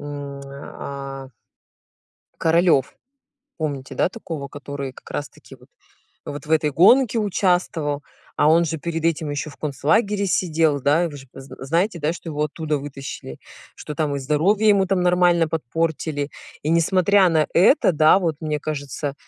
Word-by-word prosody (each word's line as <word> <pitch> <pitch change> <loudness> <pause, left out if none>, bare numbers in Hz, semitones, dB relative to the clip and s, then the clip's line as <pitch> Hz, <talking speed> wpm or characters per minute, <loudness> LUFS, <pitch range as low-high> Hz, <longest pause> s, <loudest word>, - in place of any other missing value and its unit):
м, 145 -1 -7
а. 135 -1 -8 1.1
Королёв 165 -4 +3 0.6
помните, 145 -4 -4
да, - - +2
такого, 165 -10 -7
который 140 -1 -6
как - - -15
раз - - -4
таки - - -16
вот - - -22 0.6
вот 145 0 -7
в 155 - -5
этой 155 -1 +2
гонке 230 - +5
участвовал. 175 -7 0 0.3
А 150 - +4
он 165 +2 +4
же 160 0 -3
перед 165 +1 -3
этим 160 -2 0
ещё 145 +2 -3
в 145 - -13
концлагере 200 - +1
сидел, 160 -6 +1
да, 150 +6 +3
и - - -1
вы 150 - -9
же 135 - -12
зн 135 +1 -11
з 135 - -9
знаете, 170 +4 0
да, 150 +1 0
что 170 -1 -7
его 150 -1 -2
оттуда 155 0 -2
вытащили. 135 - -8 0.4
Что 150 - -7
там 150 -3 -1
и - - -2
здоровье 165 +10 +2
ему 200 -2 +4
там 190 -2 +1
нормально 175 -2 +3
подпортили. 155 -1 -2 0.3
И 150 - -1
не 165 +1 +4
смотря 190 +2 +4
на 160 -2 +2
это, 185 - +4
да, 155 +3 +5
вот 165 -5 -1
мне 150 -1 -2
кажется, 145 -1 -4
155 Hz, 170 wpm, -22 LUFS, 145-175 Hz, 1.1 s, гонке